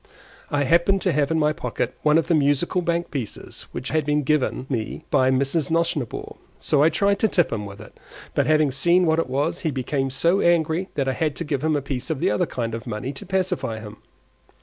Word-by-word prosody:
I 145 -1 +1
happened 170 +7 +3
to 185 - +2
have 145 -2 +1
in 160 - +1
my 150 -1 +2
pocket 160 - -3
one 150 +1 +4
of 165 - +2
the 175 - +1
Musical 150 +4 +2
Bank 170 0 -1
pieces, 130 -8 -6
which 130 - -5
had 155 0 +1
been 150 0 +1
given 140 -2 0
me 115 -5 -3
by 130 0 +4
Mrs. 135 +3 +1
Nosnibor, 160 -7 -1 0.2
so 145 - +1
I 155 - +6
tried 200 +5 +1
to 220 - +3
tip 175 - +1
him 105 -2 -3
with 100 0 -11
it; - - -13 0.4
but - - +1
having 155 -2 +3
seen 175 +7 +3
what 160 0 +2
it 165 - -1
was, 140 +3 -1
he 160 - -1
became 135 0 -1
so 170 +8 +2
angry 170 +1 +2
that 140 -2 0
I 130 - +1
had 155 +1 -1
to - - -3
give 145 -3 -2
him 155 -1 +2
a 145 - -1
piece 130 -2 -3
of 155 -4 -2
the - - +2
other 105 - +1
kind 115 -2 -3
of 115 0 -6
money 120 +5 -4
to 135 - -10
pacify 180 - -1
him. 105 0 -10
150 Hz, 230 wpm, -23 LUFS, 130-165 Hz, 0.4 s, I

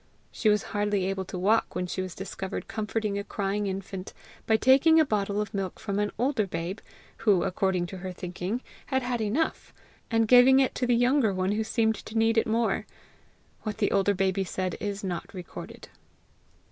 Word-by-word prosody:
She 215 - +1
was 210 -1 +3
hardly 205 -2 +1
able 190 0 -2
to 180 - -6
walk 210 +5 +2
when 180 - -1
she 185 +1 -3
was 185 -1 -6
discovered 195 0 -5
comforting 215 -1 -2
a - - -3
crying 200 0 -2
infant 190 0 -5 0.3
by 220 - +4
taking 275 +7 +5
a 315 - +5
bottle 205 -4 0
of 210 -1 -3
milk 195 -2 -3
from 205 -2 -2
an 210 0 0
older 245 -3 +1
babe 175 +4 -4 0.4
(who, 205 -6 +3
according 185 -1 0
to 190 +2 -7
her 185 +1 -5
thinking, 180 +6 -4 0.2
had 265 -2 0
had 245 -2 -1
enough) 235 +10 -1 0.3
and 225 -1 +2
giving 255 +3 +7
it 265 - +2
to 250 - -1
the 240 - +4
younger 245 -1 +3
one 185 +1 0
who 215 +2 0
seemed 220 0 +1
to 220 - -6
need 225 0 +4
it - - -1
more. 225 +1 0 0.7
What 215 -2 -4
the - - +1
older 200 0 +2
baby 190 0 +1
said 185 -1 -3
is 205 -1 -4
not 180 -3 -4
recorded. 180 -2 -9
205 Hz, 190 wpm, -27 LUFS, 190-225 Hz, 0.7 s, giving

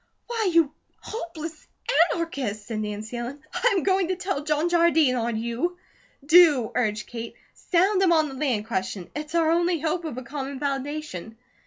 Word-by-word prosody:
"Why, 455 -4 0
you 330 -4 +3 0.3
hopeless 330 -6 -7 0.4
anarchist!" 265 -11 -3
said 220 -1 -4
Nancy 215 +2 -4
Ellen, 245 +4 -5
"I - - +2
am 365 - 0
going 380 -2 +2
to 370 - 0
tell 365 -6 -3
John 305 +2 +1
Jardine 335 -5 +4
on 235 -2 -1
you." 235 +11 -2 0.5
"Do!" 300 -7 +6
urged 215 -3 0
Kate. 230 -1 -7 0.2
"Sound 375 +2 +2
him 375 -3 +4
on 315 -2 +4
the 275 - -8
land 260 -6 -1
question. 190 -3 -3
It's 300 +2 -5
our 325 -1 +3
only 345 0 +2
hope 325 +3 -1
of 310 -7 -5
a 255 - -5
common 275 +1 -5
foundation. 275 - -4
300 Hz, 170 wpm, -25 LUFS, 235-340 Hz, 0.5 s, Do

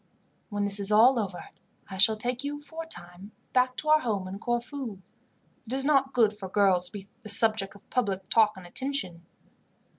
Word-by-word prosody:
"When 205 -2 -2
this 200 0 -2
is 200 +1 +2
all 235 +4 +5
over 190 -4 -5 0.4
I 190 - -8
shall 215 +3 +4
take 245 +3 -3
you, 290 +1 -4
for 320 +2 -8
a - - -18
time, 180 - -3 0.2
back 255 0 +2
to 310 - -3
our 310 0 +6
home 205 -8 -2
in 195 +2 -7
Corfu. 240 -2 -4 0.7
It 240 - -5
is 270 +1 +4
not 270 -2 +2
good 225 -5 +2
for 195 -2 -8
girls 190 -3 +2
to - - -11
be 200 -1 -9
the 215 - -9
subject 205 -2 +4
of 200 - -18
public 195 -6 -1
talk 215 -2 +3
and 185 - -11
attention." 185 -5 -3
215 Hz, 200 wpm, -27 LUFS, 195-255 Hz, 0.7 s, our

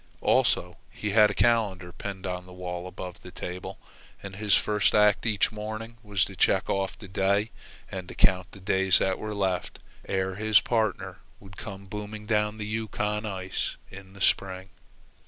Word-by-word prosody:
Also, - - +2
he 105 - -4
had 105 0 +6
a - - -2
calendar 105 -7 +2
pinned 95 +1 -6
on 90 -1 -4
the 90 - -12
wall 90 0 -5
above 90 0 -8
the - - -10
table, 90 0 -6 0.5
and 100 -1 -7
his 105 0 +3
first 105 0 +2
act 105 +1 +4
each 105 -1 +2
morning 110 +2 -6
was 105 -4 +1
to - - -9
check - - +3
off 95 -1 -1
the 100 - -10
day 100 +3 +1 0.4
and 95 -2 -5
to - - -9
count 90 -1 +3
the 100 - -12
days 95 -1 +4
that 95 -1 +1
were 105 -1 -4
left 95 -3 -1 0.3
ere 95 0 0
his 110 0 +5
partner 110 -5 -1 0.2
would 95 -1 -14
come 100 -2 -8
booming 105 +2 -6
down 105 0 +1
the 105 - -4
Yukon 105 0 -2
ice 95 -2 -2 0.2
in 95 0 -11
the 100 - -13
spring. 95 0 +1
100 Hz, 175 wpm, -27 LUFS, 95-105 Hz, 0.5 s, had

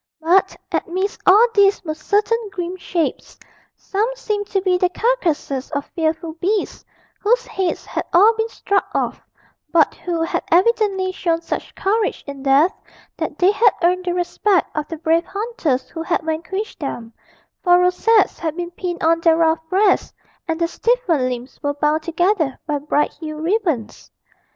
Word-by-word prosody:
But 365 +4 +3 0.2
amidst 380 +2 -2
all 415 +5 +7
these 400 -2 +3
were 310 - -2
certain 415 +8 +1
grim 360 -1 -4
shapes; 345 -2 -3 0.4
some 420 +4 -1
seemed 415 -4 -3
to 395 - 0
be 370 -1 +1
the 360 0 +2
carcases 345 - -1
of 285 -1 -2
fearful 320 0 -1
beasts, 400 +3 -1 0.4
whose 470 +4 +2
heads 375 -2 -2
had - - -3
all 410 +6 +6
been 445 0 -1
struck 400 -3 -1
off, - - -1 0.5
but 325 -4 +4
who 340 -2 -3
had 330 - -1
evidently 385 0 +2
shown 335 -3 -1
such - - -5
courage 420 +2 0
in 280 -1 -8
death 285 +7 +4 0.4
that - - -4
they 370 +2 +4
had 430 0 +4
earned 365 +1 +2
the 355 -1 -1
respect 360 +2 0
of 305 -1 -2
the 325 - -6
brave 330 +1 +1
hunters 395 - -2
who 325 - -6
had 335 +1 0
vanquished 340 +7 -4
them 235 -5 -5 0.5
for 355 -1 +6
rosettes 365 +3 +3
had 320 -2 -3
been 350 0 -4
pinned 350 -1 -5
on 330 +1 +3
their 330 -1 +4
rough 325 -1 +3
breasts, 385 +1 +2 0.3
and 325 -1 -2
their 335 - +2
stiffened 350 - +1
limbs 250 +1 -7
were 285 -1 -1
bound 300 +2 +1
together 335 -2 0
by 295 -2 -1
bright 295 +1 0
hued 310 -2 -6
ribbons. 330 - -1
350 Hz, 165 wpm, -20 LUFS, 320-400 Hz, 0.5 s, all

